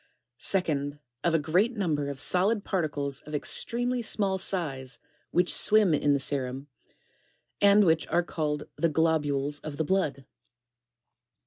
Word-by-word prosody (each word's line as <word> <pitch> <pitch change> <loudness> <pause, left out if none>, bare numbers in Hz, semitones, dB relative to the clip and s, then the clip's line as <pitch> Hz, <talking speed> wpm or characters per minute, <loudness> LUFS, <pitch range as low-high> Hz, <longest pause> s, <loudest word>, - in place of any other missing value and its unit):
2nd 150 -6 -1 0.3
Of 170 -1 +2
a - - +5
great 180 - +1
number 155 -7 -1
of 140 -1 -6
solid 195 +7 +2
particles 145 -8 -2
of 150 0 -8
extremely 245 - 0
small 200 -4 0
size 140 -9 -2 0.3
which 180 0 +2
swim 210 -5 +4
in 145 -1 +2
the 140 - +1
serum, 135 0 -2 0.9
and 200 0 +6
which 160 -1 +2
are 175 +1 +1
called 150 -3 -3
the 165 - +2
global, 150 -3 +1
s 145 0 -4
of 155 -1 -7
!ht 160 - 0
blood. 145 -7 -1
160 Hz, 140 wpm, -28 LUFS, 145-190 Hz, 0.9 s, and